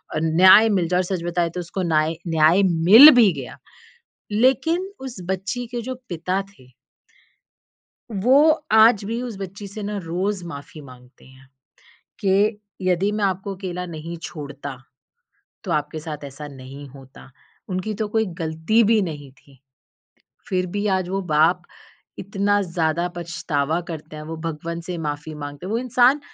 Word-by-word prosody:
अ, -, -, +1 dB
न्याय 185 Hz, +7 st, +7 dB
मिल 185 Hz, -5 st, +1 dB
जाए। 180 Hz, +1 st, +1 dB
और 185 Hz, -, +2 dB
सच 170 Hz, -, -6 dB
बताएँ 175 Hz, -1 st, 0 dB
तो 180 Hz, -, -5 dB
उसको 175 Hz, +2 st, -5 dB
नाय 155 Hz, +2 st, +2 dB
न्याय 165 Hz, +4 st, +4 dB
मिल 190 Hz, -, +8 dB
भी 205 Hz, -, +5 dB
गया 125 Hz, -, -10 dB, 0.7 s
लेकिन 320 Hz, -, +1 dB
उस 260 Hz, -5 st, -8 dB
बच्ची 200 Hz, +6 st, -3 dB
के 240 Hz, -, -2 dB
जो 255 Hz, -, -3 dB
पिता 180 Hz, +3 st, -2 dB
थे 130 Hz, -7 st, -21 dB, 1.4 s
वो 230 Hz, +7 st, +3 dB, 0.4 s
आज 220 Hz, -1 st, +6 dB
भी 230 Hz, +3 st, -3 dB
उस 245 Hz, -3 st, -5 dB
बच्ची 195 Hz, +1 st, -7 dB
से 210 Hz, +2 st, -8 dB
ना 205 Hz, 0 st, -3 dB
रोज़ 185 Hz, +3 st, -2 dB
माफ़ी 150 Hz, 0 st, -9 dB
माँगते 125 Hz, -2 st, -16 dB
हैं 130 Hz, 0 st, -18 dB, 0.8 s
के 190 Hz, -1 st, +3 dB, 0.5 s
यदि 185 Hz, +2 st, +1 dB
मैं 210 Hz, -1 st, -2 dB
आपको 195 Hz, +1 st, -2 dB
अकेला 180 Hz, -1 st, -5 dB
नहीं 165 Hz, 0 st, -7 dB
छोड़ता, 145 Hz, -3 st, -7 dB, 0.9 s
तो 185 Hz, -, -5 dB
आपके 150 Hz, 0 st, -2 dB
साथ 150 Hz, -2 st, -7 dB
ऐसा 145 Hz, +2 st, -8 dB
नहीं 140 Hz, +1 st, -11 dB
होता। 135 Hz, 0 st, -15 dB, 0.4 s
उनकी 185 Hz, +3 st, -3 dB
तो 215 Hz, -, 0 dB
कोई 220 Hz, 0 st, +3 dB, 0.2 s
गलती 160 Hz, +8 st, +1 dB
भी 220 Hz, 0 st, +3 dB
नहीं 145 Hz, -6 st, -6 dB
थी। 135 Hz, -1 st, -23 dB, 0.9 s
फ़िर 185 Hz, -1 st, 0 dB
भी 205 Hz, -, -1 dB
आज 180 Hz, -, -4 dB
वो 195 Hz, +1 st, -2 dB
बाप 165 Hz, +4 st, +3 dB, 0.6 s
इतना 200 Hz, +1 st, 0 dB
ज़्यादा 170 Hz, -1 st, -1 dB
पछतावा 160 Hz, -2 st, -2 dB
करते 155 Hz, -1 st, -8 dB
हैं, 150 Hz, -, -7 dB
वो 160 Hz, +1 st, -7 dB
भगवन 165 Hz, +1 st, -5 dB
से 175 Hz, 0 st, -6 dB
माफी 150 Hz, 0 st, -5 dB
माँगते 145 Hz, +3 st, -8 dB
हैं। 200 Hz, -, -4 dB
वो 230 Hz, -, +1 dB
इंसान 255 Hz, +3 st, +3 dB
175 Hz, 160 wpm, -22 LUFS, 155-200 Hz, 1.4 s, मिल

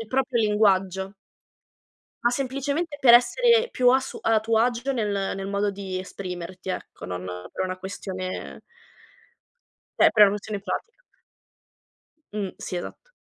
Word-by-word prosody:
il 225 Hz, -, -6 dB
proprio 260 Hz, -1 st, +1 dB
linguaggio. 195 Hz, -2 st, +2 dB, 1.1 s
Ma 240 Hz, -, +3 dB
semplicemente 280 Hz, +5 st, -2 dB
per 245 Hz, -4 st, +7 dB
essere 465 Hz, -, +4 dB
più 250 Hz, -1 st, +4 dB
a 260 Hz, +1 st, +4 dB
su -, -, -7 dB
a 225 Hz, -1 st, +3 dB
tuo 220 Hz, +1 st, +1 dB
agio 245 Hz, +3 st, +1 dB
nel 205 Hz, -6 st, -1 dB
nel 195 Hz, 0 st, -5 dB
modo 200 Hz, +1 st, 0 dB
di 190 Hz, -2 st, -5 dB
esprimerti, 185 Hz, -1 st, -6 dB
ecco, -, -, -7 dB
non 90 Hz, 0 st, -5 dB, 0.3 s
per -, -, -3 dB
una 185 Hz, 0 st, -3 dB
questione 185 Hz, -1 st, -6 dB, 1.4 s
cioè, -, -, +7 dB
per 215 Hz, 0 st, +6 dB
una 200 Hz, -, +8 dB
questione 205 Hz, 0 st, -4 dB
pratica. 465 Hz, -, -5 dB, 1.3 s
Mh, 200 Hz, -3 st, -3 dB
sì, 180 Hz, -, -5 dB
esatto. -, -, -8 dB
210 Hz, 140 wpm, -25 LUFS, 190-250 Hz, 1.4 s, una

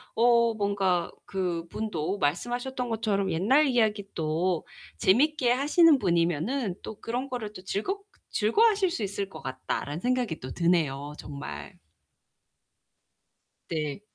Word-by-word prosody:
어 235 Hz, 0 st, +4 dB
뭔가 195 Hz, -4 st, +1 dB
그분도 180 Hz, 0 st, -2 dB
말씀하셨던 245 Hz, -, -1 dB
것처럼 205 Hz, -4 st, 0 dB
옛날 240 Hz, -, +4 dB
이야기 220 Hz, -5 st, +2 dB
또 165 Hz, +2 st, 0 dB, 0.3 s
재밌게 255 Hz, +5 st, +3 dB
하시는 295 Hz, +4 st, +5 dB
분이면은 175 Hz, -, 0 dB
또 215 Hz, -, -8 dB
그런거를 240 Hz, -3 st, -4 dB
또 185 Hz, -, -10 dB
'즐겁 385 Hz, -, -3 dB, 0.3 s
즐거워하실 395 Hz, -, +3 dB
수 225 Hz, -, -3 dB
있을 200 Hz, 0 st, -2 dB
것 -, -, -10 dB
같다.'라는 135 Hz, +3 st, -4 dB
생각이 250 Hz, -9 st, 0 dB
또 130 Hz, 0 st, -7 dB
드네요, 150 Hz, -5 st, +1 dB
정말. 75 Hz, -, -8 dB, 1.9 s
네. 155 Hz, +1 st, -3 dB
200 Hz, 260 characters per minute, -27 LUFS, 170-245 Hz, 1.9 s, 하시는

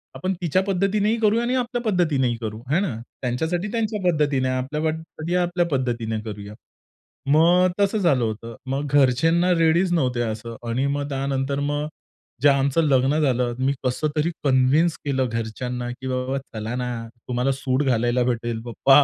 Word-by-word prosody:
आपण 185 Hz, +1 st, -1 dB
तिच्या 175 Hz, +2 st, +2 dB
पद्धतीनेही 200 Hz, +3 st, +1 dB
करूया 220 Hz, +1 st, +3 dB
आणि 245 Hz, +2 st, 0 dB
आपल्या 245 Hz, -1 st, -1 dB
पद्धतीनेही 145 Hz, -10 st, +1 dB
करू 110 Hz, -1 st, -4 dB
आहे 155 Hz, +6 st, +3 dB
ना. 180 Hz, -, -2 dB, 0.3 s
त्यांच्यासाठी 160 Hz, +10 st, -1 dB
त्यांच्या 220 Hz, -2 st, -1 dB
पद्धतीने, 145 Hz, -4 st, +1 dB
आपल्यासाठी 155 Hz, +5 st, -2 dB
आपल्या 175 Hz, 0 st, +1 dB
पद्धतीने 120 Hz, -4 st, -1 dB
करूया. 105 Hz, -1 st, -7 dB, 0.8 s
मग 175 Hz, +3 st, +5 dB
तसं 200 Hz, +1 st, +2 dB
झालं 160 Hz, -, +2 dB
होतं. 115 Hz, +1 st, -4 dB, 0.2 s
मग 145 Hz, +2 st, -2 dB
घरचे 135 Hz, +2 st, +4 dB
ना 180 Hz, +1 st, +3 dB
रेडीच 165 Hz, +3 st, +3 dB
नव्हते 125 Hz, -7 st, +1 dB
असं 115 Hz, 0 st, -4 dB
आणि 130 Hz, +4 st, 0 dB
मग 145 Hz, 0 st, -2 dB
त्यानंतर 135 Hz, 0 st, -1 dB
मग 145 Hz, +1 st, -1 dB, 0.5 s
जे 145 Hz, -, +6 dB
आमचं 140 Hz, +2 st, +2 dB
लग्न 140 Hz, 0 st, +3 dB
झालं 125 Hz, -4 st, +1 dB
मी 135 Hz, -, +2 dB
कसं 130 Hz, +4 st, 0 dB
तरी 155 Hz, +3 st, +1 dB
कन्विंस 140 Hz, +5 st, +3 dB
केलं 135 Hz, -2 st, +1 dB
घरच्यांना. 120 Hz, +2 st, -4 dB
की 130 Hz, +2 st, -7 dB
बाबा 130 Hz, +1 st, -1 dB
चला 110 Hz, -3 st, -6 dB
ना 125 Hz, 0 st, -2 dB, 0.4 s
तुम्हाला 125 Hz, +2 st, 0 dB
सूट 135 Hz, +1 st, 0 dB
घालायला 120 Hz, -1 st, +2 dB
भेटेल 120 Hz, -2 st, -2 dB
पप्पा, 135 Hz, +4 st, +5 dB
135 Hz, 160 wpm, -23 LUFS, 125-165 Hz, 0.8 s, जे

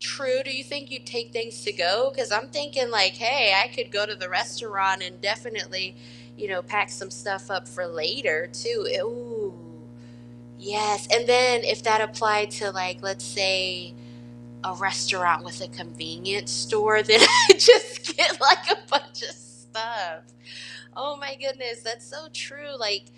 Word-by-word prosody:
True, 265 Hz, -1 st, -3 dB
do 270 Hz, -, -8 dB
you 270 Hz, 0 st, -4 dB
think 285 Hz, -1 st, -9 dB
you'd 260 Hz, -, -9 dB
take 235 Hz, -1 st, -7 dB
things 230 Hz, 0 st, -8 dB
to-go? 275 Hz, -10 st, 0 dB
'Cause 255 Hz, -5 st, -4 dB
I'm 215 Hz, +3 st, -1 dB
thinking 285 Hz, -4 st, -4 dB
like, 200 Hz, -4 st, +3 dB
"Hey, 235 Hz, -2 st, +3 dB
I 195 Hz, +5 st, +4 dB
could -, -, -8 dB
go 205 Hz, +1 st, -1 dB
to 210 Hz, -, -7 dB
the 185 Hz, -1 st, -8 dB
restaurant 190 Hz, -, -2 dB
and -, -, -10 dB
definitely, 205 Hz, -, -5 dB, 0.4 s
you 210 Hz, -, -7 dB
know, 185 Hz, -2 st, -4 dB
pack 205 Hz, -6 st, -1 dB
some 120 Hz, +1 st, -11 dB
stuff 190 Hz, +13 st, -8 dB
up 185 Hz, -10 st, -5 dB
for 175 Hz, +10 st, -8 dB
later, 175 Hz, -, -2 dB
too." 465 Hz, -2 st, -5 dB
E -, -, -1 dB
Ooh, 230 Hz, -3 st, -7 dB, 1.1 s
yes, 210 Hz, -, -3 dB
and 235 Hz, -, +3 dB
then 245 Hz, -1 st, +4 dB
if -, -, -1 dB
that 220 Hz, -1 st, +3 dB
applied 215 Hz, -1 st, 0 dB
to 205 Hz, -2 st, -5 dB
like, 185 Hz, -1 st, -5 dB
let's 195 Hz, -11 st, -6 dB
say, 185 Hz, -2 st, -1 dB, 0.7 s
a 185 Hz, -, -4 dB
restaurant 170 Hz, -1 st, 0 dB
with 120 Hz, -1 st, -11 dB
a -, -, -9 dB
convenience 120 Hz, +8 st, -7 dB
store, 210 Hz, -, +1 dB
then 220 Hz, +1 st, +7 dB
I 475 Hz, -5 st, +11 dB
just 480 Hz, +2 st, +6 dB
get -, -, +3 dB
like -, -, +6 dB
a 400 Hz, -, +2 dB
bunch 125 Hz, -, -2 dB
of -, -, -8 dB
stuff. 160 Hz, -, -9 dB, 0.8 s
Oh 290 Hz, +2 st, -6 dB
my 280 Hz, -1 st, -9 dB
goodness, 265 Hz, -4 st, -7 dB
that's 230 Hz, +1 st, -8 dB
so 305 Hz, +3 st, -14 dB
true, 285 Hz, 0 st, -10 dB
like, 210 Hz, -, -2 dB
215 Hz, 165 wpm, -23 LUFS, 185-260 Hz, 1.1 s, I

